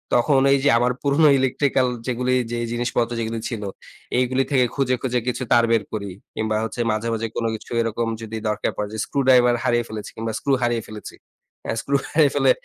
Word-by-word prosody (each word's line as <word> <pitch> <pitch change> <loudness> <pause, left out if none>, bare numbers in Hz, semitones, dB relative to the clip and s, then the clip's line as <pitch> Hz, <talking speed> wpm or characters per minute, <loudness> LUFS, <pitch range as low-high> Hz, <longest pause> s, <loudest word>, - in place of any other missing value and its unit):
তখন 135 +3 +4
এই 140 - +3
যে 140 - +4
আমার 120 +1 +2
পুরনো 145 +2 +4
ইলেকট্রিক্যাল 130 0 +1 0.2
যেগুলো 125 0 -1
এই 125 - +1
যে 120 - -2
জিনিসপত্র 120 0 -1
যেগুলো 115 0 -2
ছিল 110 -4 -5 0.5
এইগুলি 130 +1 +2
থেকে 130 -3 +4
খুঁজে, 130 -2 +1
খুঁজে 125 -1 0
কিছু 125 +1 -1
তার 120 - +6
বের 115 -2 +3
করি। 100 -2 -3 0.3
কিংবা 110 0 -1
হচ্ছে 110 +2 -3
মাঝে 110 +2 -2
মাঝে 115 0 -2
কোন 115 - -1
কিছু 110 - -11
এরকম 115 0 -1
যদি 110 0 -6
দরকার 105 - -1
পড়ে 105 - -2 0.2
স্ক্রু 140 - -2
ড্রাইভার 125 -2 +6
হারিয়ে 120 -1 +1
ফেলেছি 105 -1 -6
কিংবা 110 0 -4
স্ক্রু 140 - 0
হারিয়ে 120 -1 +1
ফেলেছি। 105 -1 -9 0.5
অ্যা - - -1
স্ক্রু 140 - -1
হারিয়ে 150 -3 +4
ফেলে 135 -2 +4
120 Hz, 200 wpm, -22 LUFS, 115-130 Hz, 0.5 s, তার